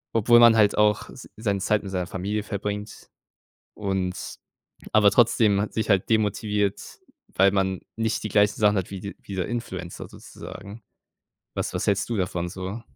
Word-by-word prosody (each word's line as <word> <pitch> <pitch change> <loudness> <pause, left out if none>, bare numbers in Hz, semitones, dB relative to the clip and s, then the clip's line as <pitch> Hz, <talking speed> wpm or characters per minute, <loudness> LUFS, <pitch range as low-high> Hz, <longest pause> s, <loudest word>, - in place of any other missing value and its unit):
Obwohl 120 +2 +5
man 115 -1 +7
halt 105 -2 +3
auch 105 0 +2
s 130 - -12
seine 100 -3 -1
Zeit 105 +2 +1
mit 100 - -7
seiner 90 -2 -2
Familie 100 +4 -3
verbringt 105 0 -5 0.7
und 95 -3 -3 0.6
aber 105 -1 +6
trotzdem 105 -2 +3
ha 105 - -1
sich 110 - -3
halt 100 0 +2
demotiviert, 105 -2 -1 0.3
weil 95 +1 +4
man 95 -2 0 0.2
nicht 115 0 -1
die 110 - -3
gleichen 105 0 +3
Sachen 105 -1 +3
hat 95 - -3
wie 95 - -5
d 100 +1 -7
wie 100 - -8
der 90 -2 -2
Influencer 95 -7 -6
sozusagen. 105 +3 -11 0.7
Was - - -3
was - - -2
hältst 100 +3 +1
du 115 - -1
davon 90 -2 -2
so? 95 +5 -6
100 Hz, 170 wpm, -24 LUFS, 95-110 Hz, 0.7 s, man